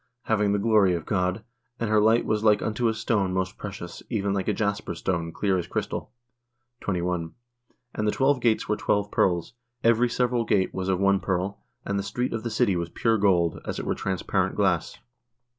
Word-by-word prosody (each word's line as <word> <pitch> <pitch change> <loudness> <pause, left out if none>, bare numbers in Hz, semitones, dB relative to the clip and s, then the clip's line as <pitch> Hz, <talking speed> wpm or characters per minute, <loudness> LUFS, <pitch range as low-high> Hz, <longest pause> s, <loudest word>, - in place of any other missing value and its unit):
Having 105 -2 +1
the - - +2
glory 100 -3 +3
of 85 - -5
God: 95 +2 -1 0.4
and 115 - -1
her 110 -1 +5
light 110 +2 +4
was 110 0 0
like 105 -2 +4
unto 115 +2 0
a 110 - +2
stone 100 -6 0
most 95 +1 -2
precious, 90 -4 -7
even 100 -4 0
like 95 -1 -2
a - - +3
jasper 100 -1 -2
stone, 85 -3 -2
clear 95 +1 0
as 85 - -5
crystal. - - -3 0.3
" 120 0 -51
21. 90 -3 -2 0.6
And 105 - -1
the - - +3
twelve 135 +1 +2
gates 115 -2 +2
were 105 - +1
twelve 105 -1 0
pearls; 85 +1 +1 0.3
every 115 +1 +4
several 120 0 +1
gate 100 -4 +1
was 95 0 -3
of 95 -1 +1
one 100 0 +3
pearl: 95 +2 -2 0.2
and 100 0 -1
the - - -2
street 125 +5 -2
of 115 - -2
the 115 - -3
city] 105 -3 +2
was 85 -1 -2
pure 115 +4 +1
gold, 90 -4 +2
as - - -4
it - - -4
were - - 0
transparent 95 -2 -1
glass." - - +1
100 Hz, 205 wpm, -26 LUFS, 95-110 Hz, 0.6 s, her